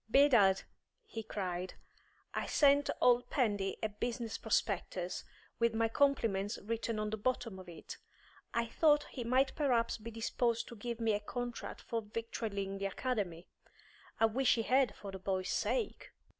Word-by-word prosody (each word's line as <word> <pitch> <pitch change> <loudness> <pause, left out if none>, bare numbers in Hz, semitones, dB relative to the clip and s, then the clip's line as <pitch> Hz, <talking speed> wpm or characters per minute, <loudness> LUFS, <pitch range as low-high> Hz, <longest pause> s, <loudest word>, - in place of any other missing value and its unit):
"Bedad," 230 -8 +5 0.4
he 225 - -6
cried, 185 -4 -4 0.6
"I - - -2
sent 285 -1 +4
old 245 0 +4
Pendy 205 -7 +1
a 220 - +1
business 230 +2 -3
prospectus, 190 -4 -1 0.4
with 235 -1 +2
my 225 0 +3
compliments 225 -6 +2
written 230 +1 -2
on 215 0 -2
the 220 - -2
bottom 230 -3 -1
of 185 -1 -10
it. 170 - -9 0.5
I 235 0 +1
thought 295 +5 +4
he 250 - -4
might 260 +3 +2
perhaps 245 -7 +1
be 225 +2 -7
disposed 230 +1 0
to 235 - -9
give 235 +2 -5
me 225 -2 +2
a 205 - +1
contract 240 +3 -5
for 230 -1 -2
victualling 210 -3 -4
the 195 - 0
Academy. 195 -6 -2 0.7
I 225 - +6
wish 250 +4 +3
he 225 - 0
had, 255 -1 +3
for 200 - -8
the 190 - -7
boys' 185 0 -1
sake." 480 -3 -1
225 Hz, 155 wpm, -34 LUFS, 200-245 Hz, 0.7 s, I